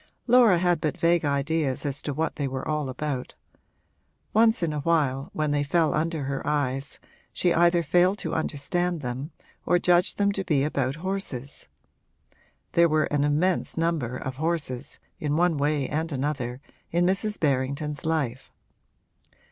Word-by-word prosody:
Laura 235 -6 +6
had 175 -2 +1
but 155 -3 -1
vague 170 0 +3
ideas 145 -1 0
as 140 0 -3
to 145 - -3
what 160 +4 -2
they 140 - -2
were 130 0 -4
all 150 -3 -1
about; 130 -1 -4 1.0
once 220 -3 +4
in 160 -2 0
a 150 - -2
while, 145 -4 +1
when 155 -1 -1
they 145 0 +1
fell 160 +2 +2
under 160 -1 -1
her 135 0 -3
eyes, 140 -2 -1 0.3
she 175 -2 +1
either 170 0 +4
failed 180 +5 +3
to - - -4
understand 170 +3 -1
them 130 +3 -4 0.3
or 175 - +3
judged 175 0 +3
them 200 0 +2
to 195 -1 -3
be 150 -6 +1
about 140 -2 -1
horses. 145 -9 -4 1.0
There 170 0 +4
were 155 -1 +2
an 145 -1 +2
immense 155 +6 +1
number 160 -7 -1
of 130 0 -6
horses, 150 -5 -2 0.2
in 150 0 -1
one 175 -1 +3
way 145 -1 0
and 160 +3 -2
another, 130 -3 -3 0.3
in 175 +1 +2
Mrs. 205 +3 0
Berrington's 140 +1 -1
life. 140 -6 -2
150 Hz, 155 wpm, -26 LUFS, 140-170 Hz, 1.0 s, Laura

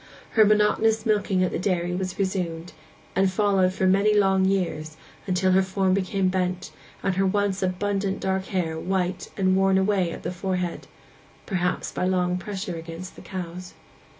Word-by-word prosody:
Her 220 - +6
monotonous 215 +1 +3
milking 205 -4 +2
at 180 - 0
the - - -2
dairy 175 -2 0
was 185 0 -3
resumed, 180 -3 -2 0.4
and 190 0 +3
followed 195 -2 +2
for 190 0 -1
many 200 +3 +4
long 190 -2 +3
years, 170 -5 -1 0.3
till 185 +1 +2
her 190 +1 +5
form 190 0 +1
became 190 0 0
bent, 185 0 -1 0.3
and 190 -1 0
her 195 - +3
once 200 0 0
abundant 195 +1 -1
dark 190 0 -1
hair 165 -5 -2
white 185 0 -2
and 185 -1 +3
worn 195 0 +3
away 190 -2 +2
at - - -8
the - - -2
forehead—perhaps 180 0 -4
by - - -2
long 180 -1 +1
pressure 190 -2 -5
against 165 +3 -8
the - - -12
cows. 180 -1 -7
190 Hz, 160 wpm, -25 LUFS, 180-195 Hz, 0.4 s, Her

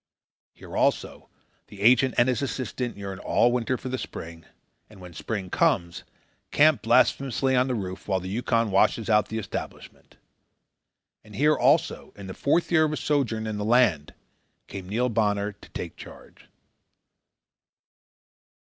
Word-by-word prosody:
Here, - - -11
also, - - -1 0.4
the 100 - -12
agent 125 +4 +4
and 120 - +4
his 125 -1 0
assistant 125 -3 -4
yearn 100 -1 -7
all 120 - +2
winter 125 +1 -1
for 130 - -8
the 130 0 -3
spring, 80 0 -8 0.4
and 105 -3 -16
when 90 -1 -11
the 80 - -13
spring 100 -5 -5
comes, 85 0 0 0.4
camp - - +4
blasphemously 135 0 +2
on 125 +1 +2
the 130 - -1
roof 95 -3 -6
while 95 -2 0
the 95 - -8
Yukon 115 +1 0
washes 110 +4 +2
out 105 0 +3
the 110 - -5
establishment. 105 -4 -8 1.1
And 105 -1 -14
here, 150 +5 +3
also, 145 +6 +1
in 100 - -10
the 95 - -7
fourth 165 - 0
year 160 -2 +4
of - - -1
his 150 - -3
sojourn 120 -7 -1
in 110 -1 -4
the - - -2
land, 110 - +2 0.5
came 95 -2 -9
Neil 120 +5 0
Bonner 105 -3 0
to 100 - -18
take - - -7
charge. - - -14
110 Hz, 155 wpm, -25 LUFS, 100-130 Hz, 1.1 s, agent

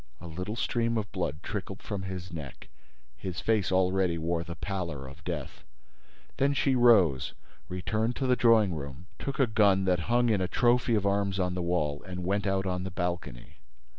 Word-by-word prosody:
A 85 - -11
little 90 +6 -5
stream 115 -1 0
of 105 -3 -3
blood 75 +5 -3
trickled 95 -1 -5
from 100 -3 -4
his 90 -2 -6
neck. 75 -5 -8 0.5
His 90 +3 -5
face 110 -5 +1
already 95 -1 +2
wore 85 +1 -1
the 85 0 -7
pallor 85 -9 -4
of 65 0 -12
death. - - -5 0.7
Then 140 +1 +2
she 135 -1 +2
rose, 105 - +4 0.3
returned 110 +6 -1
to 135 - -2
the 125 -1 +4
drawing 115 -6 +4
room, 70 0 -7
took 140 0 -4
a 135 - +6
gun 100 -4 +3
that 90 -2 +2
hung 120 0 +3
in 105 -4 +2
a 90 - +1
trophy 120 +2 +3
of 105 -2 0
arms 100 -1 +1
on 90 -1 0
the 90 - -2
wall 80 -4 0
and 90 -1 -6
went 100 +2 0
out 95 0 +1
on 90 -1 -1
the 95 - -4
balcony. 85 -9 -4
95 Hz, 190 wpm, -29 LUFS, 85-110 Hz, 0.7 s, a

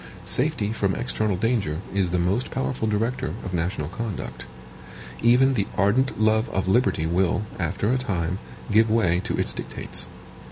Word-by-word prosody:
Safety 125 -6 +1
from 100 -4 0
external 110 -4 0
danger 100 -8 0
is 95 -2 +1
the 90 - 0
most 95 +8 0
powerful 130 -4 -2
director 110 -4 -1
of 95 - -5
national 85 -3 -1
conduct. 100 - -5 0.7
Even 125 +3 +5
the 100 -6 0
ardent 115 +7 +2
love 110 +1 +3
of 95 -1 -1
liberty 95 -6 +2
will, 90 +4 +1 0.2
after 95 +6 0
a 130 - +1
time, 90 -6 -2 0.3
give 110 +2 +5
way 95 -6 +3
to - - -2
its - - -1
dictates. - - -5
105 Hz, 155 wpm, -25 LUFS, 90-115 Hz, 0.7 s, Even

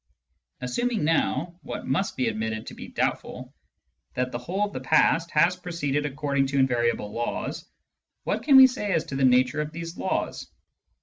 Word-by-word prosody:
Assuming 220 - -1
now, 165 +2 0
what 145 - -6
must 170 +9 -1
be 130 -2 +1
admitted 110 0 -3
to - - -8
be - - -9
doubtful, - - -3 0.6
that 125 0 -1
the 120 - -4
whole 185 +11 -1
of 205 - -8
the - - -4
past 160 +4 +3
has 165 +4 +3
proceeded 150 -5 -2
according 140 -1 -1
to 140 +1 -2
invariable 120 -5 +1
laws, 120 +2 -4 0.5
what - - -1
can 280 - +4
we 265 - +11
say 245 -6 -1
as 160 - +1
to 135 - -7
the 135 - 0
nature 125 +2 +3
of 150 0 -4
these 165 +1 -7
laws 190 - -2
145 Hz, 175 wpm, -26 LUFS, 125-175 Hz, 0.6 s, we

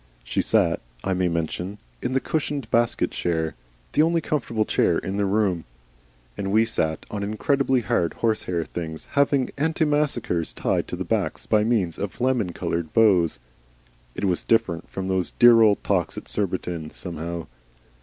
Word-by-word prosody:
She - - -1
sat, - - +2 0.2
I 95 - 0
may 90 0 +1
mention, 85 +4 -3 0.2
in 130 - -2
the 135 - +3
cushioned 140 -5 -2
basket 115 0 +2
chair, 80 -2 -1 0.4
the - - +4
only 165 +1 +3
comfortable 120 -8 -1
chair - - +2
in 95 +2 -3
the 100 -1 +1
room, 95 -4 +1 0.7
and 100 -1 -3
we 110 +2 +4
sat 80 -8 -1
on 105 - -3
incredibly 130 +5 +1
hard, 85 -5 0
horsehair 90 -7 -1
things 80 -2 -6
having 140 -2 +2
antimacassars 145 - 0
tied - - 0
to - - -4
their - - -4
backs - - -1
by 105 -1 +3
means 105 -7 0
of 100 -2 -4
lemon 125 -7 +1
coloured 85 -2 -3
bows. 95 -8 +4 0.8
It - - -2
was 90 -3 +1
different 95 -8 +1
from 95 0 -4
those 95 -1 0
dear 120 -1 +7
old 105 -3 +4
talks - - 0
at - - -7
Surbiton, 90 -5 -2
somehow. 85 -1 -5
100 Hz, 160 wpm, -24 LUFS, 85-120 Hz, 0.8 s, dear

